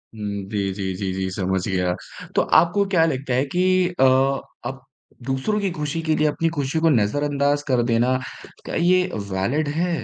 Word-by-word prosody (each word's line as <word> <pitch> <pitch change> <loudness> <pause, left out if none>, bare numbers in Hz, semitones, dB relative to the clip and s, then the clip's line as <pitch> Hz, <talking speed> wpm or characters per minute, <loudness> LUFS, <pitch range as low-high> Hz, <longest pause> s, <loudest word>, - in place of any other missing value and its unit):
हुँ, 100 -2 -4
जी, 100 -2 -1
जी, 95 -1 -3
जी, 95 0 -3
जी, 95 0 -2
समझ 95 0 -1
गया। 90 -2 0 0.4
तो - - +4 0.2
आपको 200 +4 +2
क्या 165 -3 +5
लगता 135 -4 -2
है 130 +3 +2
कि 180 +6 -1 0.4
अ, - - +5 0.6
आप 135 +1 -6 0.4
दूसरों 135 - -1
की 200 -2 0
खुशी 155 0 -3
के 160 -1 +1
लिए 155 0 +2
अपनी 165 +2 0
खुशी 140 +3 0
को 165 0 +3
नज़रअंदाज़ 145 +4 +1
कर 125 -3 +2
देना, 120 +2 +2 0.5
क्या - - -5
ये 180 +2 +3 0.3
वैलिड 115 +11 0
है? 170 0 -1
135 Hz, 180 wpm, -22 LUFS, 105-160 Hz, 0.6 s, क्या